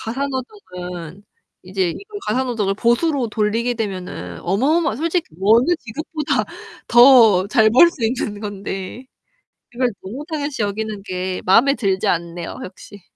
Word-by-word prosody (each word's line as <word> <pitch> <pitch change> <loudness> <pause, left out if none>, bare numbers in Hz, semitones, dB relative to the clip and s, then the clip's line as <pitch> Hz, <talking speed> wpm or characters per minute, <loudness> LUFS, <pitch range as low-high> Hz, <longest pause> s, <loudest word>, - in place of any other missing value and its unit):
가사 260 +5 -3
노동은 180 - -7 0.4
이제 185 -1 -1
이거 410 - -8
가사 260 - +1
노동을 220 -6 -1
보수로 240 +3 +1
돌리게 225 +3 0
되면은 185 - -5
어마어마 265 - +1
솔직히 335 +3 -1
어느 230 - +4
직업보다 300 +5 -3 0.4
더 235 -6 +7
잘 220 +1 +4
벌 265 +10 +7
수 265 -8 -5
있는 220 -3 -2
건데. 200 +2 -6 0.7
이걸 250 0 +1
너무 250 +10 -7
당연시 290 -5 -3
여기는 210 0 -3
게 185 -1 -4
마음에 235 +9 +5
들지 195 -6 -1
않네요, 170 0 -3
역시. 195 +1 -12
220 Hz, 295 characters per minute, -20 LUFS, 190-260 Hz, 0.7 s, 더